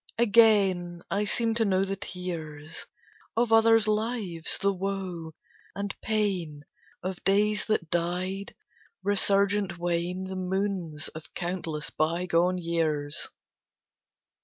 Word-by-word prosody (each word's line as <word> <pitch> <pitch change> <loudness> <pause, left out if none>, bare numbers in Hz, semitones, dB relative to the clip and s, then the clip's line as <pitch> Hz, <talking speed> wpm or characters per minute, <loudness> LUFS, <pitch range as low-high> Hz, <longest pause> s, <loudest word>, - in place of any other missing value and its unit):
Again 200 -6 +4
I 205 +1 +1
seem 225 +3 +1
to 230 0 +2
know 190 -2 +2
the 195 0 -2
tears 165 -5 -6 0.5
Of 230 -1 +3
other 225 0 +7
lives, 215 -6 -1
the 200 0 +2
woe 185 -4 -4 0.4
and 200 0 -3
pain 185 -9 -1 0.4
Of 185 -1 -4
days 210 +2 +3
that 170 -7 0
died; 180 +3 -1 0.5
resurgent 200 -1 +2
wane 175 +1 -1
The 190 0 -5
moons 185 -4 -2
of 160 0 -11
countless 170 -4 -3
bygone 175 +2 +1
years. 160 -4 -1
185 Hz, 110 wpm, -28 LUFS, 170-205 Hz, 0.5 s, other